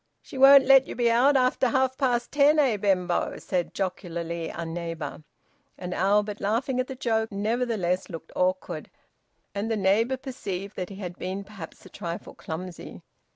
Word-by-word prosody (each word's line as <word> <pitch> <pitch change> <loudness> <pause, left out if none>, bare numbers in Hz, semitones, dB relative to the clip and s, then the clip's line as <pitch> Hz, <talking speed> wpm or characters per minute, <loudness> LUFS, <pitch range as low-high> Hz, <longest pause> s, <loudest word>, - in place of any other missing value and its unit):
"She - - -13
won't 270 0 +8
let 270 0 +6
you - - -6
be 240 -1 +2
out 265 +4 +4
after 255 0 +2
half 260 +2 +1
past 250 -3 0
ten, 290 +1 +4
eh, 270 -7 +3
Benbow?" 190 -3 0
said 180 -2 -2
jocularly 170 -3 -3
a 170 - -5
neighbour. 165 -2 -5 0.6
And 180 -1 -5
Albert, 205 +3 +1
laughing 235 +5 0
at 255 - 0
the 265 - -6
joke, 225 -3 -1
nevertheless 210 -3 -1
looked 165 -2 -9
awkward. 185 0 -1 0.6
And 205 +2 -3
the 225 - 0
neighbour 215 +6 +2
perceived 200 -7 -6
that 180 -1 -4
he 195 - -9
had 180 -3 -7
been 190 +2 -4
perhaps 195 -5 -11
a - - -12
trifle 170 0 -6
clumsy. 175 +2 -8
205 Hz, 165 wpm, -26 LUFS, 180-255 Hz, 0.6 s, won't